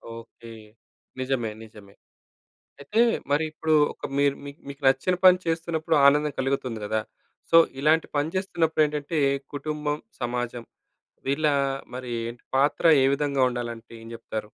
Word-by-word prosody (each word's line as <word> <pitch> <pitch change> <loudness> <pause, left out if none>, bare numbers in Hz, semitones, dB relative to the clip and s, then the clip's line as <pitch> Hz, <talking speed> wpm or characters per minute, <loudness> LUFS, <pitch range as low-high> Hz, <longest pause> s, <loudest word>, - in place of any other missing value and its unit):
Okay. 115 0 -12 0.7
నిజమే, 130 -4 -1
నిజమే. 105 -2 -15 0.9
అయితే 215 +10 0 0.3
మరి 150 +2 +2
ఇప్పుడు, 155 0 0 0.2
ఒక - - -14
మీరు 140 -1 +3
మీక్ 140 +2 -10
మీకు 140 0 -9
నచ్చిన 135 +7 +2
పని 185 0 +8
చేస్తున్నప్పుడు 165 -1 -1
ఆనందం 150 +1 +4
కలుగుతుంది 130 -3 -1
గదా! 110 +1 -1 0.5
సో, 165 - +6 0.2
ఇలాంటి 155 +2 +3
పని 145 +3 0
చేస్తున్నప్పుడు 165 -5 +1
ఏంటంటే 150 +2 -3 0.4
కుటుంబం, 150 0 -3 0.2
సమాజం 120 -1 -3 0.6
వీళ్ళ 150 +3 +1 0.5
మరి 125 -1 -6 0.2
ఏంటి 120 0 -8
పాత్ర 140 +4 +1 0.2
ఏ - - +5
విధంగా 140 -2 0
ఉండాలంటే 120 -2 -6
ఏం 115 - -11
చెప్తారు? 110 -2 -6
140 Hz, 130 wpm, -25 LUFS, 120-155 Hz, 0.9 s, పని